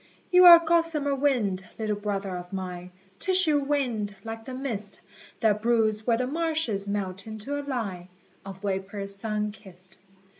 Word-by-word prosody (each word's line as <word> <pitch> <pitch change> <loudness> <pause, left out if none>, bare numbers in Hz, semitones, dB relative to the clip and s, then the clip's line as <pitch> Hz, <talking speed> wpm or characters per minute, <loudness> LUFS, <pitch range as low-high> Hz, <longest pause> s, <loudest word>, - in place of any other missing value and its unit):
You 360 0 +7
are 345 -1 +12
gossamer 330 -4 +1
winged, 245 -9 0
little 215 -2 -1
brother 200 -2 -3
of 180 0 -8
mine, 180 -2 -6 0.3
Tissue 365 -6 +4
winged, 250 -8 -1
like 225 0 -7
the 260 - -6
mist 230 -7 -3 0.4
That 210 -2 +2
broods 220 -2 +1
where 230 -1 +3
the 255 - -1
marshes 310 -9 -1
melt 195 -1 -2
into 220 +7 -5
a - - -3
line 220 -11 -4 0.4
Of 195 0 -10
vapour 195 0 -3
sun 210 +1 -1
kissed. 185 -3 -17
215 Hz, 150 wpm, -26 LUFS, 195-275 Hz, 0.4 s, are